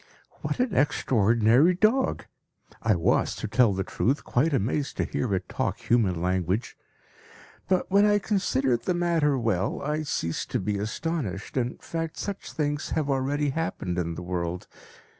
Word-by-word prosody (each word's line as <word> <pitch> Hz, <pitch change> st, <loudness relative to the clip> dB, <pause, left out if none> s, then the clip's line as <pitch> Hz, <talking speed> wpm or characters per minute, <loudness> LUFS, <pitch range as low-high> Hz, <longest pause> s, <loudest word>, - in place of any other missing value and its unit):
What -, -, -3 dB
an 245 Hz, -6 st, 0 dB
extraordinary 120 Hz, -, +3 dB
dog! 220 Hz, +8 st, +2 dB, 0.6 s
I 110 Hz, -3 st, +3 dB
was, 85 Hz, -, +1 dB
to -, -, -4 dB
tell 115 Hz, +1 st, +4 dB
the 95 Hz, 0 st, -1 dB
truth, 130 Hz, +9 st, -1 dB
quite 145 Hz, +7 st, +1 dB
amazed 135 Hz, +3 st, -1 dB
to -, -, +1 dB
hear 125 Hz, -, -2 dB
it 95 Hz, -, -3 dB
talk -, -, -2 dB
human 105 Hz, -8 st, +1 dB
language. 90 Hz, +4 st, -1 dB, 0.9 s
But 185 Hz, 0 st, 0 dB
when 200 Hz, +2 st, +5 dB
I 205 Hz, 0 st, +4 dB
considered 135 Hz, -, 0 dB
the 180 Hz, -, +1 dB
matter 165 Hz, -5 st, +2 dB
well, 110 Hz, -7 st, 0 dB
I 150 Hz, +2 st, -1 dB
ceased 85 Hz, -, -2 dB
to -, -, 0 dB
be 100 Hz, +1 st, -2 dB
astonished. 110 Hz, -, -3 dB
In 125 Hz, -1 st, -1 dB
fact, 165 Hz, -1 st, -5 dB
such 200 Hz, -1 st, -5 dB
things 145 Hz, -1 st, -2 dB
have 145 Hz, -3 st, 0 dB
already 140 Hz, +2 st, 0 dB
happened 95 Hz, -, -2 dB
in 85 Hz, -1 st, -2 dB
the 90 Hz, -, -6 dB
world. 90 Hz, 0 st, -3 dB
130 Hz, 160 wpm, -26 LUFS, 100-165 Hz, 0.9 s, when